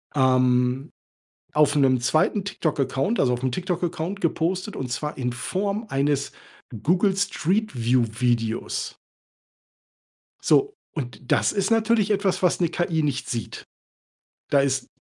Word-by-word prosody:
ähm, 130 +1 +2 0.6
auf 150 -1 +4
'nem 130 -3 +3
2. 155 - +2
TikTok 155 -7 -2
Account 135 - 0
also 125 -2 +3
auf 120 - -3
'nem 130 - +1
TikTok 180 +2 -2
Account 175 +3 -3
gepostet 180 +4 -1
und 125 -2 -4
zwar 150 +3 -3
in 125 -2 -1
Form 200 - -2
eines 140 0 0 0.5
Google 185 +4 +3
Street 200 +2 0
View 125 0 +4 0.2
Videos. 115 -2 -1 1.4
So, 415 +1 +2 0.2
und 125 -4 -7
das - - +3
ist 200 +2 0
natürlich 225 -2 +2
etwas, 200 -2 +1
was 180 0 +2
'ne 170 - +3
KI 170 -2 0
nicht 145 -3 -2
sieht. 115 -4 -5 0.8
Da 140 - +4
ist 135 -2 0
150 Hz, 135 wpm, -24 LUFS, 130-190 Hz, 1.4 s, auf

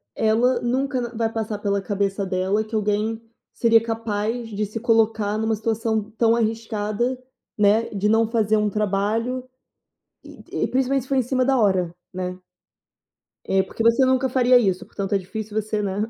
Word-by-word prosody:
ela 230 +4 +2
nunca 260 +2 0
n 240 -1 -3
vai 225 0 +1
passar 220 -2 -3
pela 200 -1 -1
cabeça 200 0 -1
dela 190 +3 0
que 220 +1 -7
alguém 215 +1 0 0.3
seria 230 -1 +4
capaz 225 0 -3
de 210 0 -3
se 215 +3 -6
colocar 220 -2 +2
numa 220 0 0
situação 220 0 -1
tão 230 0 +4
arriscada, 225 +1 -1 0.4
né, 210 +2 +3
de 205 -1 -1
não 225 +1 +3
fazer 220 -2 +2
um 210 0 +1
trabalho, 215 +5 -1 0.8
e - - -6
e - - +2
principalmente 265 0 0
se 260 - -16
for 275 - 0
em 260 - +4
cima 255 +1 0
da 270 -1 +3
hora, 190 -6 +2 0.2
né. 180 0 -4 1.1
É, 190 0 +2
porque 210 +4 -4
você 230 +3 +4
nunca 260 0 +2
faria 250 0 +5
isso, 190 -6 +1
portanto 195 -1 -4
é - - +4
difícil 215 +3 -4
você, 215 0 -2
né, 200 +1 -1
220 Hz, 170 wpm, -23 LUFS, 205-235 Hz, 1.1 s, faria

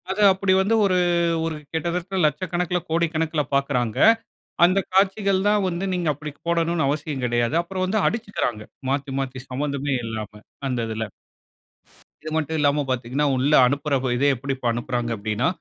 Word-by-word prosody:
அது 195 +2 -1
அப்டி 190 0 +1
வந்து 210 +4 +2
ஒரு 185 -2 +2 0.5
ஒரு 165 -1 -2 0.2
கிட்டத்தட்ட 175 +3 -2
லட்சக்கணக்கில, 180 +2 0
கோடிக்கணக்கில 160 -1 0
பார்க்கிறாங்க. 130 -5 0 0.7
அந்த 185 +3 +3
காட்சிகள் 195 0 +2
தான் 210 -1 +2
வந்து 175 +1 -3
நீங்க 175 -2 -1
அப்டி 150 +2 -7 0.2
போடணும்னு 170 -3 +1
அவசியம் 145 -2 -2
கிடையாது. 120 +3 0
அப்புறம் 185 +1 -3
வந்து 205 +4 0
அடிச்சிகிறாங்க, 205 - -2 0.3
மாத்தி 135 0 -1
மாத்தி 130 -1 -4
சம்மந்தமே 140 +1 -2
இல்லாம 110 -2 -6 0.3
அந்த 125 -2 -1
இதில. 110 0 -3 1.2
இது 155 - -5
மட்டும் 160 0 -1
இல்லாம 145 0 +3
பார்த்தீங்கனா, 130 +3 -1
உள்ள 135 +4 +1
அனுப்புற 145 +2 -1 0.2
இதே 140 +3 +2
எப்டி 135 +2 -3 0.2
அனுப்புறாங்க 120 0 -2
அப்டினா 105 +6 -1
150 Hz, 140 wpm, -23 LUFS, 130-180 Hz, 1.2 s, அந்த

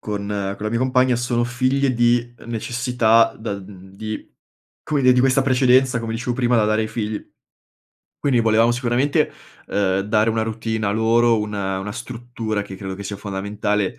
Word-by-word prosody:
con 105 -1 -4 0.3
con 105 - -8
la - - 0
mia 115 - 0
compagna 130 -1 +3
sono 120 -1 0
figlie 130 +2 +1
di 120 0 +2
necessità, 120 0 +2
da 110 -2 -4
mhmm, 95 -1 -11
di 110 +2 -6 0.5
come 145 -3 -1
dire, 125 0 +6
di 125 - +4
questa 135 +1 +3
precedenza 130 -1 +3
come 115 0 -4
dicevo 120 +1 -2
prima 120 -2 +2
da 110 - +3
dare 110 +1 +1
ai 110 - -3
figli. 110 -2 -3 1.0
Quindi 135 -4 +2
volevamo 115 +1 +3
sicuramente, 125 +3 +1 0.4
uhm, 95 -1 +1
dare 110 +2 +2
una 110 0 0
routine 110 -1 -2
a 100 - +1
loro, 115 +1 +3
un 105 0 -4
una 95 0 -3
struttura 115 -3 -4
che 95 -2 -9
credo 95 -1 -6
che 100 - -8
sia 100 0 -5
fondamentale, 100 0 -2
115 Hz, 175 wpm, -21 LUFS, 105-125 Hz, 1.0 s, dire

